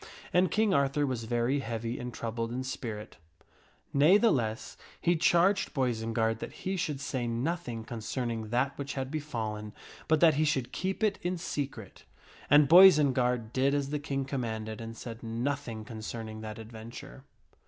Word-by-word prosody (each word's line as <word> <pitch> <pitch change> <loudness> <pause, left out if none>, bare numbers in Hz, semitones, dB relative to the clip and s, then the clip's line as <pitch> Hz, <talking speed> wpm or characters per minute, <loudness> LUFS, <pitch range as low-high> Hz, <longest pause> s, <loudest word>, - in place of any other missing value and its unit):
And 180 0 +4
King 215 +2 +2
Arthur 140 -1 +2
was 125 -4 -3
very 120 +4 +1
heavy 115 -1 -4
and 125 0 -5
troubled 115 0 -4
in 125 +2 -3
spirit; 115 -7 -6 0.8
ne'theless 140 - +3 0.2
he 175 0 +2
charged 185 +3 +3
Boisenard 115 -3 0
that - - -6
he 190 +1 0
should 155 -6 -2
say 130 -3 -2
nothing 120 -1 -2
concerning 115 -1 -4
that 125 +4 0
which 140 0 -4
had 135 0 -3
befallen, 110 -9 -4 0.3
but 160 -1 +3
that 165 -1 +6
he - - +4
should 135 -5 0
keep 190 +4 -3
it 210 -2 +2
in 180 +1 -1
secret. 140 - -5 0.4
And 145 0 +7
Boisenard 135 -10 +6
did 135 +2 +2
as 140 -1 -1
the 150 - -1
King 135 -1 -2
commanded, 110 -5 -4
and 115 0 -7
said 115 -1 -8
nothing 115 0 -3
concerning 110 0 -6
that 110 -1 -6
adventure. 110 - -10
125 Hz, 155 wpm, -30 LUFS, 115-150 Hz, 0.8 s, And